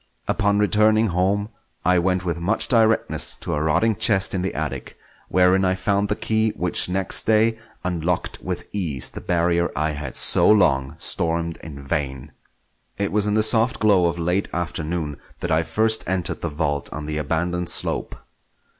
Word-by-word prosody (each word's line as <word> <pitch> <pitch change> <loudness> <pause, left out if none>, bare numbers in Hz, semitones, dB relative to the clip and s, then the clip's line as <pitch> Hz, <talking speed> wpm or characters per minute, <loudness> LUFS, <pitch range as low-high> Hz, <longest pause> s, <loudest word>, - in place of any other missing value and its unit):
Upon 100 -1 +1
returning 110 +1 +3
home 95 +4 0 0.4
I 90 0 +4
went 90 +1 0
with 85 -1 -2
much 95 +7 0
directness 110 -2 +2
to - - -5
a 75 - -1
rotting 90 +9 +1
chest 100 -2 +3
in 95 - -1
the 95 - -3
attic, - - -5 0.3
wherein 90 +1 +3
I 95 0 +1
found 100 +2 0
the 105 - 0
key 110 +1 0
which 90 0 +3
next 95 0 +1
day 110 +1 +3 0.2
unlocked 90 -1 -2
with - - -5
ease 80 -11 -1
the - - -9
barrier 85 0 0
I 75 +1 0
had 75 -3 -6
so - - +4
long 70 -11 +3
stormed 85 0 -1
in 70 -3 -10
vain. 70 0 -3 0.7
It 100 0 -2
was 105 0 0
in 105 - 0
the 110 - +3
soft 115 +3 +3
glow 100 -5 +3
of 85 0 -2
late 90 +4 -1
afternoon 80 -2 -4 0.2
that 90 - -4
I 80 +1 +3
first 110 +6 0
entered 90 -4 -1
the 85 - -2
vault 75 -2 -2
on 75 +1 -6
the 75 0 -3
abandoned 85 +3 -2
slope. - - -2
90 Hz, 170 wpm, -22 LUFS, 80-105 Hz, 0.7 s, I